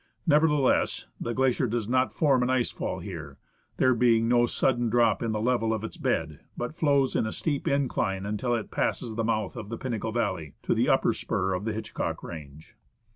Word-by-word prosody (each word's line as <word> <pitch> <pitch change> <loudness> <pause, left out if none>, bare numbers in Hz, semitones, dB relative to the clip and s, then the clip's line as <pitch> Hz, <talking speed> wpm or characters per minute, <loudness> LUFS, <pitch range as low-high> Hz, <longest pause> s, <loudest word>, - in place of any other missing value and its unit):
Nevertheless, 150 -3 +3
the 120 - -3
glacier 130 -1 +2
does 115 -2 -2
not 130 +2 +2
form 140 -5 +2
an 125 - +1
ice 130 -2 +1
fall - - -4
here, 80 -8 -7 0.4
there 130 0 +4
being 115 -1 +3
no 120 0 +4
sudden 120 -1 +1
drop 120 0 +3
in 115 -2 -1
the 110 - -1
level 115 -1 +1
of 110 - -5
its 110 - -6
bed, 80 -2 -1 0.2
but 120 +4 -3
flows 140 -5 +2
in 110 - +1
a - - -3
steep 145 +3 -2
incline 110 -8 0
until' 115 +4 -1
it 115 - 0
has - - -24
passed 115 -3 -1
the 115 - -1
mouth 110 -3 -1
of 105 - -7
the 115 - -4
Pinnacle 115 -3 -3
valley, 95 - -2
to - - +1
the - - +2
upper - - +3
spur 95 0 -1
of 90 +3 -3
the 110 - -1
Hitchcock 110 0 -4
range. 75 -2 -10
115 Hz, 205 wpm, -27 LUFS, 105-130 Hz, 0.4 s, there